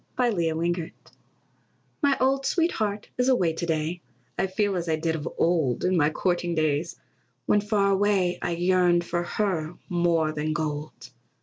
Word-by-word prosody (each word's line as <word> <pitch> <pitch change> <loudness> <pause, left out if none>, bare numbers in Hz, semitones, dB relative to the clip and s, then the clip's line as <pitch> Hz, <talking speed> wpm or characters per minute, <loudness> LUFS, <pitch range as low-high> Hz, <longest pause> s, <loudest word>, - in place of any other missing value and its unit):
MY 245 -2 +3
OLD 200 - -2
SWEETHEART 165 +1 -2 0.9
My 280 -1 +3
old 270 +1 +2
sweetheart 215 - 0
is 250 +1 +3
away 180 -11 +2
to 170 - -3
day; 160 +2 -1 0.3
I 190 - 0
feel 200 +1 0
as 170 -2 -2
I 160 - +2
did 160 +1 -1
of 150 - -4
old, 160 -7 +1
In 185 +1 +2
my 150 -3 +3
courting 175 +1 -1
days, 155 +1 0 0.5
when 210 - +3
far 200 -1 +1
away 195 -3 +2
I 170 - -1
yearned 175 0 +3
for 175 0 -1
her 175 -3 -2
more 170 -3 +1
than 155 0 -2
gold. 150 -5 -4
175 Hz, 165 wpm, -26 LUFS, 160-200 Hz, 0.9 s, MY